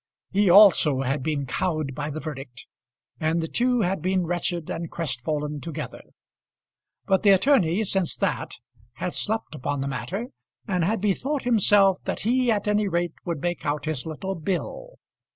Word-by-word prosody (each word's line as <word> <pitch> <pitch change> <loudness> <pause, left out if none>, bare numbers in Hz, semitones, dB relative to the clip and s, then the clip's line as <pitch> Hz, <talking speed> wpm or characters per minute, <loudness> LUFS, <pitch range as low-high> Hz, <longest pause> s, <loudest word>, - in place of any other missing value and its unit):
He 200 0 +3
also 175 -8 +7
had 135 +2 -1
been 145 0 -1
cowed 155 0 -2
by 150 +2 -4
the 155 +1 -5
verdict, 135 -5 -8 0.5
and 160 +1 +1
the 165 - -2
two 245 +5 +1
had 190 -3 0
been 185 +1 +1
wretched 175 -1 -2
and 165 0 -4
crestfallen 150 0 -3
together. 160 -1 -6 1.0
But 190 -2 +2
the 205 - +4
attorney 195 - +4
since 190 -4 -1
that - - -1 0.4
had 170 +9 -4
slept 220 -3 -1
upon 145 -1 -3
the 135 - -2
matter, 140 - -4 0.4
and 180 -2 0
had 210 +4 0
bethought 255 +8 0
himself 205 -5 +4
that - - -3
he 250 +3 +2
at 210 -2 +1
any 210 0 +2
rate 170 -2 -1
would 170 -5 -3
make 175 -1 -2
out 145 0 -2
his 155 -2 -2
little 190 +5 -4
bill. 195 - -4
175 Hz, 165 wpm, -25 LUFS, 150-200 Hz, 1.0 s, also